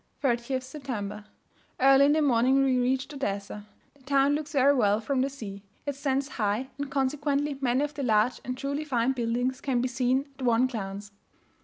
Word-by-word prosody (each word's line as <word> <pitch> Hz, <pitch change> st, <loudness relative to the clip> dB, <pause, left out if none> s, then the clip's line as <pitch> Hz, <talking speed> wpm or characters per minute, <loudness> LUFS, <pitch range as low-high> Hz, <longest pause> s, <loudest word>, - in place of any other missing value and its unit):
30th 255 Hz, 0 st, 0 dB
September. 235 Hz, -7 st, -6 dB, 0.5 s
Early 270 Hz, +1 st, +6 dB
in 290 Hz, -, +4 dB
the 310 Hz, 0 st, +2 dB
morning 260 Hz, +1 st, +3 dB
we 260 Hz, -2 st, +2 dB
reached 260 Hz, +3 st, 0 dB
Odessa. 205 Hz, -5 st, -4 dB, 0.3 s
The 285 Hz, -, -26 dB
town 275 Hz, +1 st, +2 dB
looks 300 Hz, 0 st, -3 dB
very 280 Hz, 0 st, +5 dB
well 210 Hz, -6 st, +2 dB
from 255 Hz, +3 st, -1 dB
the 270 Hz, -, +1 dB
sea. 210 Hz, -8 st, -8 dB, 0.2 s
It 285 Hz, -, -1 dB
stands 275 Hz, 0 st, -1 dB
high; 220 Hz, +1 st, -2 dB
and 285 Hz, -1 st, -3 dB
consequently 280 Hz, +1 st, -1 dB
many 255 Hz, +1 st, +2 dB
of 295 Hz, 0 st, -3 dB
the 290 Hz, -, -5 dB
large 225 Hz, -1 st, +2 dB
and 255 Hz, 0 st, -4 dB
truly 280 Hz, +3 st, -3 dB
fine 255 Hz, -4 st, +1 dB
buildings 245 Hz, +1 st, -1 dB
can 260 Hz, -3 st, 0 dB
be 250 Hz, -, 0 dB
seen 255 Hz, +2 st, 0 dB
at -, -, -5 dB
one 240 Hz, +1 st, +4 dB
glance. 205 Hz, -4 st, -5 dB
260 Hz, 185 wpm, -27 LUFS, 235-275 Hz, 0.5 s, Early